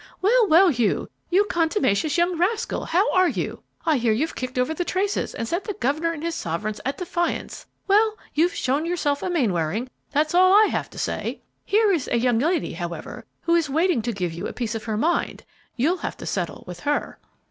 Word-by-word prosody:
"Well, 455 Hz, +3 st, +4 dB
well, 360 Hz, +3 st, +6 dB
Hugh, 240 Hz, -8 st, 0 dB, 0.2 s
you 375 Hz, +4 st, +4 dB
contumacious 325 Hz, -, +1 dB
young 345 Hz, +1 st, +2 dB
rascal! 370 Hz, +7 st, -1 dB
how 380 Hz, +7 st, +2 dB
are 370 Hz, -1 st, +4 dB
you? -, -, -4 dB, 0.2 s
I 315 Hz, -3 st, +3 dB
hear 235 Hz, -2 st, +2 dB
you've 290 Hz, +10 st, 0 dB
kicked 255 Hz, 0 st, -5 dB
over 250 Hz, +5 st, +1 dB
the 355 Hz, -, -2 dB
traces 390 Hz, +3 st, -1 dB
and 230 Hz, -, -3 dB
set 345 Hz, -, -1 dB
the 415 Hz, -, -4 dB
governor 315 Hz, 0 st, 0 dB
and 320 Hz, -2 st, -6 dB
his 335 Hz, 0 st, -1 dB
sovereigns 205 Hz, -, -3 dB
at 270 Hz, -, -2 dB
defiance! 345 Hz, -1 st, -3 dB, 0.2 s
Well, 430 Hz, +2 st, +3 dB, 0.2 s
you've 335 Hz, +4 st, +2 dB
shown 280 Hz, +5 st, 0 dB
yourself 295 Hz, -5 st, 0 dB
a -, -, -2 dB
Mainwaring, 220 Hz, -, 0 dB, 0.2 s
that's 305 Hz, +2 st, +1 dB
all 370 Hz, +1 st, +6 dB
I 425 Hz, +1 st, +6 dB
have -, -, -2 dB
to -, -, -14 dB
say! -, -, -3 dB, 0.2 s
Here 425 Hz, 0 st, +3 dB
is 330 Hz, -8 st, 0 dB
a 240 Hz, -, +1 dB
young 240 Hz, -1 st, +2 dB
lady, 325 Hz, +4 st, 0 dB
however, 170 Hz, 0 st, -6 dB, 0.2 s
who 335 Hz, -, +1 dB
is 335 Hz, -3 st, +2 dB
waiting 320 Hz, -2 st, +2 dB
to 235 Hz, +2 st, -2 dB
give 180 Hz, -5 st, -3 dB
you 170 Hz, -, -4 dB
a -, -, -7 dB
piece 235 Hz, -2 st, -3 dB
of 225 Hz, -1 st, -5 dB
her 220 Hz, -2 st, -2 dB
mind; 330 Hz, +10 st, 0 dB, 0.3 s
you'll 310 Hz, +9 st, +1 dB
have -, -, -5 dB
to -, -, -8 dB
settle -, -, -3 dB
with 180 Hz, -1 st, -8 dB
her." 290 Hz, +8 st, -2 dB
315 Hz, 210 wpm, -24 LUFS, 240-360 Hz, 0.3 s, well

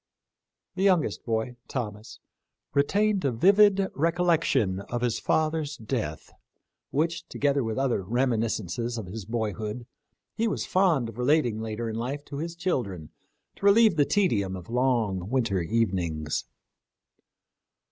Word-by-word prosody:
The 190 Hz, -, -4 dB
young 185 Hz, -5 st, +4 dB
est -, -, -6 dB
boy, 115 Hz, +1 st, -2 dB
Thomas, 110 Hz, -4 st, -5 dB, 0.6 s
retained 200 Hz, +8 st, +2 dB
a 135 Hz, -, +2 dB
vivid 195 Hz, -, +5 dB
recollection 165 Hz, -, +1 dB
of 120 Hz, 0 st, -2 dB
his 120 Hz, -2 st, 0 dB
father's 155 Hz, -1 st, 0 dB
death, 110 Hz, -, -4 dB, 0.6 s
which, 165 Hz, +4 st, -1 dB
together 140 Hz, -1 st, +1 dB
with 110 Hz, 0 st, -3 dB
other 135 Hz, -6 st, +1 dB
remi 120 Hz, +5 st, +1 dB
niscences 115 Hz, +1 st, -2 dB
of 110 Hz, -, -4 dB
his 100 Hz, +2 st, -7 dB
boyhood, 110 Hz, +1 st, -3 dB, 0.5 s
he 230 Hz, +1 st, 0 dB
was 210 Hz, -, -2 dB
fond 170 Hz, -11 st, +2 dB
of 115 Hz, +1 st, -11 dB
relating 125 Hz, -4 st, +2 dB
later 110 Hz, +1 st, -4 dB
in 110 Hz, 0 st, -3 dB
life 135 Hz, +5 st, -4 dB
to 140 Hz, -, -7 dB
his 165 Hz, +3 st, -4 dB
children 110 Hz, -, -2 dB, 0.5 s
to -, -, -5 dB
relieve 215 Hz, -2 st, +6 dB
the 150 Hz, -, +4 dB
tedium 115 Hz, -, +1 dB
of 90 Hz, +4 st, -9 dB
long 115 Hz, -7 st, 0 dB
winter 115 Hz, -7 st, +1 dB
evenings. 85 Hz, -7 st, -1 dB
125 Hz, 135 wpm, -27 LUFS, 110-160 Hz, 0.6 s, relieve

